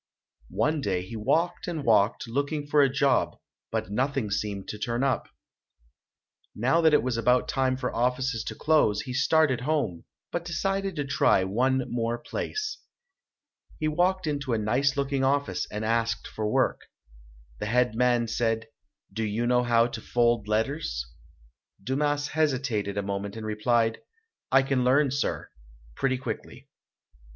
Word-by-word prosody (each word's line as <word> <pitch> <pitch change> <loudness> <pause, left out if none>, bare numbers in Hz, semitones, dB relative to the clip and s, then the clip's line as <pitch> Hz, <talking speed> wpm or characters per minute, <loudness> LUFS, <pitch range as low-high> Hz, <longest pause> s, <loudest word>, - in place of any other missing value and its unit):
One 155 0 +1
day 95 -6 -1
he 100 +5 -8
walked 160 +13 0
and 165 -4 -3
walked, 105 0 +3
looking 145 +5 -2
for 145 0 +3
a 135 - +5
job, 135 -1 +1 0.3
but 95 - -2
nothing 130 -1 -1
seemed 100 -1 -3
to 105 - -6
turn 120 +3 -1
up. 135 -1 0 1.3
Now 135 +10 +2
that 160 -2 +5
it 115 - +3
was 125 -2 -1
about 125 +2 +2
time 130 -1 0
for 125 -1 -3
offices 125 0 0
to - - -5
close, 145 -10 +2
he 125 - -6
started 130 0 +3
home, 135 - -1 0.3
but 175 - -2
decided 195 +2 -2
to 145 -2 -2
try 115 -7 +3
one 130 +7 +1
more 120 0 -1
place. 430 - -4 1.0
He 155 - 0
walked 180 +4 +1
into 140 -4 -2
a - - +2
nice 130 +7 +1
looking 140 -1 0
office 140 +1 0
and 105 +1 -3
asked 115 +1 0
for 105 -1 -3
work. - - +1 0.8
The - - -3
head 125 +1 +2
man 120 0 +2
said, 115 0 -1 0.4
"Do 110 - -2
you 110 +2 -1
know 125 0 +3
how 120 -1 +3
to 120 - -5
fold 120 -3 +1
letters?" 110 - -1 0.7
Dumas 145 +4 0
hesitated 130 -10 0
a 100 - 0
moment 100 +1 -4
and 110 -1 -6
replied, 115 +1 +1 0.5
"I 135 0 +6
can 135 -2 0
learn, 135 +2 +3
sir, 140 +1 -2 0.4
pretty 130 -1 0
quickly". 130 - -7
125 Hz, 155 wpm, -27 LUFS, 115-145 Hz, 1.3 s, I